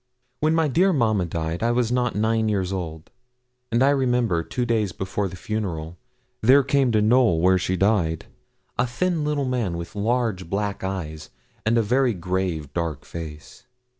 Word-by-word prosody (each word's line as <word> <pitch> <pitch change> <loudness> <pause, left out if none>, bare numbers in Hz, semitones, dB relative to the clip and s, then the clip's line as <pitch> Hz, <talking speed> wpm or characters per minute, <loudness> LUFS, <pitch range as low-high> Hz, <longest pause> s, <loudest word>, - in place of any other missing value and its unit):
When 155 +1 +2
my 165 -1 +3
dear 180 +8 +3
mamma 110 - +1
died 80 +1 -3
I 115 - +2
was 120 -1 +1
not 125 -1 0
nine 110 +1 +1
years 95 -2 -1
old; 80 -3 -6 0.6
and 120 +3 +3
I 140 - +5
remember, 125 -10 +1
two 125 +9 -3
days 110 -6 0
before 95 +3 -2
the 90 - -8
funeral, 90 -6 -4 0.5
there 135 +5 +6
came 140 -2 +2
to 105 -1 +3
Knowl, 115 -6 +4
where 95 +2 +4
she 90 +1 -1
died, 90 -5 +1 0.5
a 125 - +3
thin 165 +6 -1
little 150 -2 0
man, 120 -9 -1
with 85 0 -7
large 105 -4 -1
black 100 0 -2
eyes, 80 -5 -5 0.4
and 115 +2 +3
a 115 - +3
very 125 +1 +2
grave, 90 -4 -2
dark 80 -4 -3
face. 80 +7 -9
105 Hz, 170 wpm, -24 LUFS, 90-125 Hz, 0.6 s, there